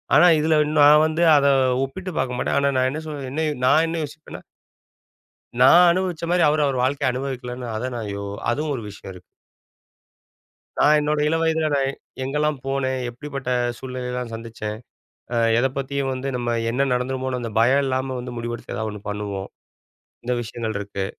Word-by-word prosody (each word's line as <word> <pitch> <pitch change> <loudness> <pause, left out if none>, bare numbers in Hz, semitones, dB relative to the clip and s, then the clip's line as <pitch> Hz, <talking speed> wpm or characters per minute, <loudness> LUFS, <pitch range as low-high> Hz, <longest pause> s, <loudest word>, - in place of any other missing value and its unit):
ஆனா 180 - +7
இதில 155 0 +3
இன்னும் 150 -1 +2
நான் 150 +1 +7
வந்து 160 +2 0
அதை 140 0 +4 0.3
ஒப்பிட்டு 185 +7 -7
பார்க்க 125 -1 -1
மாட்டேன். - - 0
ஆனா 140 0 +2
நான் 130 0 +2
என்ன 155 +3 -4
சொல் 145 -3 -5
என்ன 155 +2 -1 0.2
நான் 155 +5 +5
என்ன 165 0 -3
யோசிப்பேன்னா 155 +2 -11 1.2
நான் 175 +7 +8
அனுபவிச்ச 180 -2 -2
மாரி 175 0 +3
அவரு, 150 +1 +2
அவரு 135 - -1
வாழ்க்கைய 135 0 +1
அனுபவிக்கல 125 -1 -5 0.2
அதான் 125 +3 -3
நான் 110 -3 -5
யோ 100 - -5 0.3
அதுவும் 150 +3 -1
ஒரு 115 - -6
விஷயம் 100 -1 -10
இருக்கு. 90 0 -14 1.5
நான் 150 +1 +5
என்னோட 150 0 0
இளவயதில, 160 -1 +1
நான் 135 -1 +1 0.3
எங்கலாம் 150 +2 0
போனேன். 130 -1 -1
எப்படிப்பட்ட 135 +1 -6 0.3
சூழ்நிலையெல்லாம் 125 -2 -5
சந்திச்சேன். 115 -2 -6 0.6
அ - - 0 0.2
எத 125 - +3
பத்தியும் 140 0 -2
வந்து 130 +1 -4
நம்ம 120 -1 -1 0.2
என்ன 135 +4 +1
நடந்துருமோனு, 130 +1 -1
அந்த 115 -2 -4
பயம் 130 +5 +4
இல்லாம 130 0 -1
வந்து 125 0 -7
முடிவெடுத்து, 120 0 -5
ஏதாவது 110 -1 -3
ஒண்ணு 105 - -8
பண்ணுவோம். 100 -2 -4 0.8
இந்த 125 - 0
விஷயங்கள் 110 -1 -4
இருக்கு. 100 -1 -4
130 Hz, 165 wpm, -22 LUFS, 120-150 Hz, 1.5 s, நான்